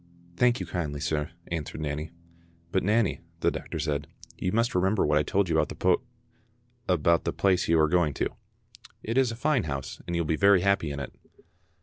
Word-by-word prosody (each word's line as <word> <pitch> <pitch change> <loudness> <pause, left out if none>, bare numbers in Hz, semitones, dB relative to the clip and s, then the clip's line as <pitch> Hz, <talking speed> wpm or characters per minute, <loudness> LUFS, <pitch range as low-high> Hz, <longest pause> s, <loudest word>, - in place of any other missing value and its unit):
"Thank 120 +4 +3
you 95 - -3
kindly, 80 -5 -3
sir," 75 +1 -1 0.2
answered 80 -2 -4
Nanny. 75 +1 -3 0.6
"But 95 - +2
Nanny," 105 0 +1 0.2
the - - +3
doctor - - -5
said, 75 -1 -2 0.3
"you 90 - -2
must 115 +3 +1
remember 95 +3 +2
what 75 0 +3
I - - +3
told 95 +6 +1
you 85 - 0
about - - +2
the - - -6
poo 90 -1 +2 0.5
—, 120 0 -24
about 85 +2 +3
the - - -1
place 95 -2 +2
you 80 0 +4
are 80 - +5
going 80 -3 +2
to. - - 0 0.7
It 115 - -3
is 130 -3 +3
a - - -5
fine 130 - +1
house, 70 -3 -5
and 85 - -2
you 85 - +1
will - - -5
be 80 - +2
very 100 +1 +5
happy 100 -5 +2
in 70 0 -4
it." 70 - -6
90 Hz, 215 wpm, -27 LUFS, 75-105 Hz, 0.7 s, are